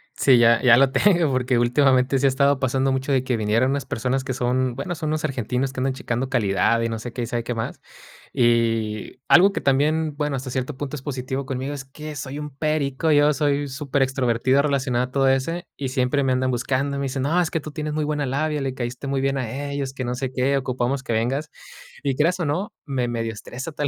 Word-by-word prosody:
Sí, 130 -3 +5
ya 120 0 +5
ya 120 -2 +6
lo 135 0 +4
tengo, 175 -7 +3
porque 125 -1 +1
últimamente 130 +2 +3
sí 140 - +1
ha - - +5
estado 140 +1 +2
pasando 135 +1 +1
mucho 130 +1 -1
de 130 -1 +2
que 130 -2 0
vinieron 115 +5 +1
unas 140 0 -2
personas 130 +3 -1
que 130 -1 -3
son, 125 0 0
bueno, 160 +7 -4
son 155 -2 -4
unos 155 0 -1
argentinos 130 0 -2
que 130 - -5
andan 130 0 0
checando 125 0 -3
calidad 115 -1 +2
y 115 - 0
no 115 -1 -3
sé 120 +1 -6
qué 120 - -3
y - - -1
sabe 120 0 -3
qué 120 0 -3
más. 115 - -4 0.5
Y 115 -3 +1
algo 195 +3 +7
que - - -3
también, 150 +3 +1
bueno, 150 -2 -1
hasta 130 0 -5
cierto 130 +2 -3
punto 145 0 -4
es 135 - -7
positivo 130 0 -4
conmigo, 135 +2 -3
es 135 -2 -6
que 150 +3 -9
soy 135 +2 -6
un 150 -1 -6
perico, 155 0 0
yo 145 0 +5
soy 145 -1 0
superextrovertido 130 -2 +1
relacionado 130 -4 0
a 130 - -13
todo 135 0 +2
ese 165 +7 -1
y 135 -2 -3
siempre 130 +2 +1
me 130 - +1
andan 130 0 +1
buscando, 135 +3 -1
me 140 - -2
dicen: 130 0 -2
"No, 165 +6 +2
es 165 - -1
que 165 - 0
tú 155 0 -8
tienes 150 0 -4
muy 155 0 -1
buena 150 -1 -1
labia, 150 +3 -1
le 135 -1 -2
caíste 125 +2 -5
muy 135 -1 0
bien 135 0 0
a 135 +3 -4
ellos", 140 -2 -3
que 130 - -5
no 125 +1 -2
sé 130 0 -3
qué, 135 +2 +1
"ocupamos 130 +1 -1
que 115 - -2
vengas". 130 +7 -1 0.5
Y 135 -2 0
creas 170 +6 +1
o 170 - -1
no, 190 +9 -2
me 130 -4 -1
medio 115 -1 -2
estresa 125 +8 -7
tal 145 -1 -2
135 Hz, 235 wpm, -23 LUFS, 125-145 Hz, 0.5 s, algo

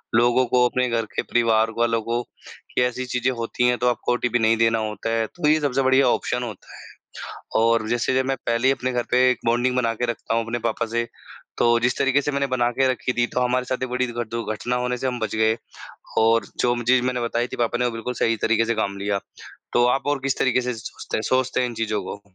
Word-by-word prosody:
लोगों 120 +2 +4
को, 125 +1 +3
अपने 125 0 0
घर 115 -1 0
के - - +1
परिवार 115 -1 +2
वालों 115 -1 +1
को 115 +2 -1 0.5
कि - - +3
ऐसी 125 +1 0
चीज़ें 125 0 0
होती 115 +1 0
हैं 125 0 +2
तो 125 - 0
आपको 120 - -1
ओटीपी 120 -1 0
नहीं 115 0 +3
देना 115 0 +3
होता 110 +1 -3
है। 115 -1 +1
तो 155 +3 -3
ये 155 +1 +4
सबसे 135 -2 +1
बढ़िया 130 0 +4
ऑप्शन 125 0 0
होता 110 -5 -9
है - - -13 0.8
और 115 -1 +2
जैसे 120 +2 0
जब 130 0 +2
मैं 135 0 -1
पहले 115 +2 +1
ही - - +5
अपने 130 -1 -3
घर 120 -1 -1
पर 125 - 0
एक 125 -1 +4
बॉन्डिंग 120 +2 +2
बनाकर 120 -1 0
रखता 115 -1 -3
हूँ 115 - +1
अपने 120 +1 -3
पापा 115 - -2
से, 115 +1 -2 0.5
तो 120 0 +3
जिस 120 +1 0
तरीक़े 135 +1 +2
से 145 - -2
मैंने 140 0 0
बनाकर 130 +1 +1
रखी 125 0 -2
थी, 120 -1 +2
तो 125 - -2
हमारे 125 0 +1
साथ 130 0 -2
ये - - -1
बड़ी 125 +1 -1
दुर 120 -1 -4
दुर्घटना 115 +1 -2
होने 125 0 -1
से 130 - -2
हम 125 -1 -2
बच 110 -1 -3
गए 110 +1 +2 0.6
और 115 +1 +4
जो 120 0 +2
म 120 - -3
चीज़ 125 +1 +3
मैंने 125 -1 -1
बताई 120 +1 -1
थी - - -8
पापा 120 0 0
ने 125 - +2
वो 120 - 0
बिल्कुल 115 +2 -4
सही 115 -1 +1
तरीक़े 115 0 +2
से 115 +1 0
काम 100 -2 -2
लिया। 100 0 -1 0.5
तो 120 - +4
आप 135 +3 0
और 145 -1 +1
किस 135 -1 0
तरीक़े 130 -1 +2
से 125 0 -2
सोचते 110 - -6
हैं - - -1
सोचते 130 0 +1
हैं 125 - +1
इन - - -7
चीज़ों 110 -2 -1
को। 100 - -7
120 Hz, 250 wpm, -23 LUFS, 115-125 Hz, 0.8 s, ही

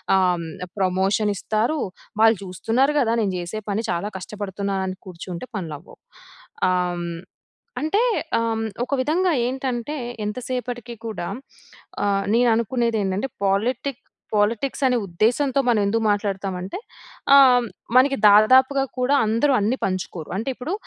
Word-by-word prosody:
ఆహ్, 190 - +4
హ్మ్, 170 -1 -5 0.3
ప్రమోషన్ 195 +3 +1
ఇస్తారు. 220 +10 -1 0.4
వాళ్ళు 225 -2 +6
చూస్తున్నారు 225 - 0
కదా! 230 -3 +2
నేను 195 -3 0
చేసే 175 +5 -5
పని. 215 +3 -1
చాలా 200 +5 -2
కష్టపడుతున్నాను 200 -1 -4
అని 185 - -5
కూర్చుంటే, 180 +3 -7
పనులు 165 -5 -5
అవ్వవు. - - -17 0.7
ఆహ్, 180 -1 0
హ్మ్, 170 -1 -5 0.6
అంటే 400 +10 +2 0.4
ఆహ్, 230 - 0
హ్మ్, 225 0 -2 0.2
ఒక - - -3
విధంగా 350 +4 +1
ఏంటంటే 260 +2 -3 0.3
ఎంత 210 +4 -4
సేపటికి 245 -2 -4
కూడా 210 -5 -4 0.8
ఆహ్, 195 -1 +1
నేను 240 0 +4
అనుకునేది 230 -1 0
ఏంటంటే, 195 +7 -1 0.2
పాలిటిక్ 240 +7 0 0.3
పాలిటిక్స్ 225 +7 0
అనే 250 -1 +3
ఉద్దేశంతో 240 +10 +1
మనమెందుకు 220 -1 +2
మాట్లాడుతామంటే 195 -2 -2 0.6
ఆహ్, 275 - +9 0.2
హ్మ్, 240 - -3 0.3
మనకి 275 +2 +5
దాదాపుగా 260 +6 +5 0.2
కూడా 265 +3 +3
అందరూ 230 +6 +2
అన్ని 220 +6 0
పంచుకోరు. 185 -4 -4
అంటే 230 +5 -2
ఇప్పుడు 280 +9 -4
220 Hz, 135 wpm, -23 LUFS, 195-255 Hz, 0.8 s, ఆహ్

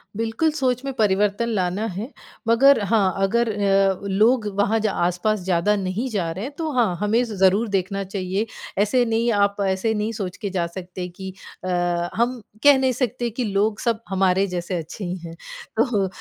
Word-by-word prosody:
बिल्कुल, 225 +8 0
सोच 260 -4 0
में 275 - -3
परिवर्तन 210 +2 +2
लाना 190 0 -1
है। 225 +7 -4 0.4
मगर 270 +4 +6
हाँ, 200 -3 +2
अगर 235 +4 +2
अ, 195 -1 +2
लोग 215 +4 +3
वहाँ 205 +2 +2
ज 215 - 0
आस-पास 180 +3 0
ज़्यादा 185 +2 +1
नहीं 195 +5 -2
जा 190 -7 -1
रहे 190 +6 -5
हैं 285 - -7
तो 320 -2 -2
हाँ, 230 -9 +2
हमें 220 +4 +2
ज़ 230 -3 -5
ज़रूर 200 +5 +4
देखना 195 0 -1
चाहिए। 190 +2 -2 0.4
ऐसे 245 +4 +3
नहीं 230 +1 +1
आप 200 -1 +2
ऐसे 190 +4 0
नहीं 210 +1 -1
सोच 195 -5 -5
के 205 -3 -4
जा 180 -3 -1
सकते 180 +1 -7
कि 190 +1 -8 0.3
अ, - - -4 0.5
हम 240 +2 0 0.2
कह 285 -2 +8
नहीं 260 -1 +2
सकते 240 -1 -1
कि 240 +3 -3
लोग 205 +1 0
सब 230 -2 0
हमारे 190 0 +2
जैसे 180 0 -3
अच्छे 165 +5 -7
ही 180 +1 -3
हैं। 165 - -9 0.4
तो 205 -7 +2
205 Hz, 185 wpm, -22 LUFS, 190-235 Hz, 0.5 s, कह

